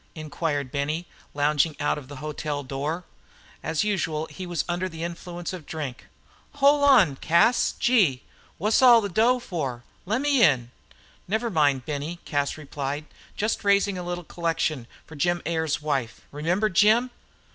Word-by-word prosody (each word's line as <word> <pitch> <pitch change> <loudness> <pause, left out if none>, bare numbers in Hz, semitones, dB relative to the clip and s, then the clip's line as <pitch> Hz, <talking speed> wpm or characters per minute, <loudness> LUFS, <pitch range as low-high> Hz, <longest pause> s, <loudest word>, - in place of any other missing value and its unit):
Inquired 150 -3 -3
Benny, 150 +4 -2 0.3
lounging 150 +1 +2
out 145 - 0
of 135 - -13
the 145 - -9
hotel 150 0 -4
door. 145 +6 -3 0.6
As 160 +3 -1
usual 160 -7 -1
he 185 -1 -7
was 175 -3 -2
under 175 +2 -2
the 165 -1 -7
influence 175 +1 -6
of 175 -5 -8
drink. 145 -6 -6 0.5
"Hol' 285 +1 +4
on, 215 - +5
Cas 170 - +3
gee! 190 - +3 0.3
Wha's 210 +7 +2
all 240 -3 +8
the 200 - -3
dough 230 +7 +3
for? 140 - -4 0.2
Lemme 235 +8 0 0.2
in." 130 - +3 0.6
"Never 220 +4 -1
mind, 145 -6 +2
Benny," 150 +3 -4 0.4
replied 145 0 -5
Cas. - - -25
"Just 215 +2 -1
raising 200 -1 +3
a 180 - -4
little 175 0 -4
collection 160 -6 -2 0.2
for 160 - -12
Jim 175 +4 +1
Ayers' 160 -3 -1
wife. 135 -7 -2
Remember 170 +8 0
Jim?" 220 +5 +4
165 Hz, 150 wpm, -25 LUFS, 145-200 Hz, 0.6 s, all